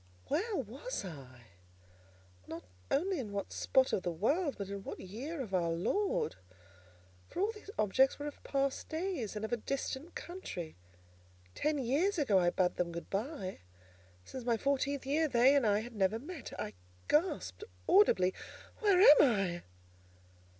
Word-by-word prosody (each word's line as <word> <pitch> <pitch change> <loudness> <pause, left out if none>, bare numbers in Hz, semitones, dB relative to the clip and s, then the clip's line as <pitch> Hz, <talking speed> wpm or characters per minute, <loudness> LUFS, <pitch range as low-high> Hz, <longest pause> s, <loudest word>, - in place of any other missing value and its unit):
Where 415 +6 0
was - - -4
I? 130 -8 -10 1.0
Not 165 +1 -7 0.3
only 360 +4 +1
in 220 -6 -5
what 200 -1 -3
spot 260 -1 +2
of - - +2
the 180 - -2
world, 280 - +1
but 200 - -4
in 200 0 -6
what - - -6
year 255 - -6
of 215 -7 -6
our 175 -2 +2
Lord? 195 - 0 0.9
For - - -7
all 410 +4 +2
these 420 -2 -13
objects 260 +6 +3
were 290 - -5
of 295 - -7
past 275 -1 -1
days, 320 - -3
and 210 +1 -2
of 220 - -4
a - - +2
distant 275 +6 -4
country. 260 - -6 0.8
Ten 300 - 0
years 285 +10 +1
ago 220 - +4
I 175 -1 +3
bade 180 0 +1
them 175 -1 0
good 170 0 -7
by; 200 -2 -3 0.7
since 260 - -7
my 235 -1 +1
fourteenth 280 +2 0
year 305 +4 +2
they 260 +1 +5
and 270 -6 +3
I 205 0 +3
had 240 +2 -8
never 205 0 +1
met. 300 +4 -8
I 105 - -4 0.3
gasped 345 +6 +1 0.2
audibly, 190 - +5 0.5
"Where 405 -5 +4
am 305 -6 +9
I?" 195 -9 +2
260 Hz, 160 wpm, -33 LUFS, 195-310 Hz, 1.0 s, am